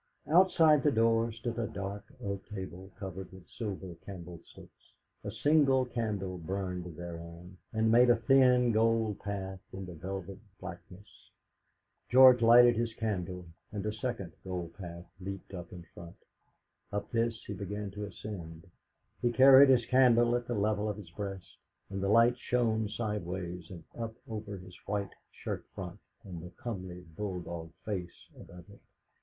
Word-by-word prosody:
Outside 165 -4 +6
the 150 - +4
door 115 -1 +3
stood 115 +1 -4
a 115 - 0
dark 100 +1 -5 0.2
oak 100 -1 -3
table 95 -2 -7
covered 95 -1 -7
with 95 -2 -14
silver 95 -5 -5
candlesticks; 90 -3 -12 0.3
a - - -4
single 140 -4 +3
candle 105 -7 -3
burned 90 -1 -4
thereon, 85 +1 -8
and 110 0 +2
made 120 +2 +6
a 120 - +7
thin 125 0 +5
gold 110 -1 +2
path 95 -2 -4
in 95 0 -6
the 90 - -8
velvet 95 +3 -6 0.2
blackness. 90 +1 -9 1.0
George 130 0 +8
lighted 120 +1 +8
his 115 -1 -1
candle, 90 -5 -3 0.3
and 105 -1 -4
a 105 - -1
second 110 -5 -4
gold 90 -3 -5
path 85 -3 -8
leaped 95 +1 -7
out 85 -2 -7
in 90 -1 -9
front; 85 -1 -11 0.8
up 105 0 -3
this 115 -1 0
he - - -5
began 100 +1 -5
to 105 +1 -5
ascend. 85 -5 -8 0.6
He 120 - +2
carried 135 +3 +8
his 125 -3 +5
candle 120 -2 +5
at 120 0 -2
the 120 - -1
level 105 0 +1
of 105 - -3
his 95 -6 -11
breast, 95 -1 -7 0.3
and 95 0 -3
the 100 - 0
light 115 +3 +5
shone 110 -4 +1
sideways 90 -6 -4
and 85 -3 -9
up 115 -1 -5
over 105 -2 -5
his 90 -1 -12
white 100 0 -2 0.2
shirt - - -5
front - - -6 0.2
and 90 -4 -8
the 90 - -8
comely, 95 -6 -6
bulldog 85 -4 -5
face 95 -5 -5
above 90 -1 -13
it. 100 - -16
100 Hz, 155 wpm, -31 LUFS, 90-115 Hz, 1.0 s, George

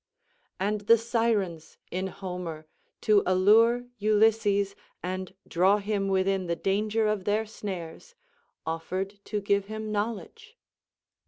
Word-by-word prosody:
And 205 +2 0
the 230 +3 +6
sirens, 220 -8 -1
in 185 +1 -2
Homer, 180 -4 -6 0.4
to 210 -2 +5
allure 220 +6 +4
Ulysses, 210 -2 +3 0.3
and 185 +1 -4
draw 190 +4 +4
him 205 -1 -1
within 190 -1 +1
the 170 - 0
danger 210 +4 0
of 210 -3 0
their 210 +2 +1
snares, 200 - -7 0.5
offered 185 +5 -3
to 210 - -2
give 200 0 +1
him 215 +1 -5
knowledge. 235 - -4
200 Hz, 115 wpm, -28 LUFS, 185-215 Hz, 0.5 s, the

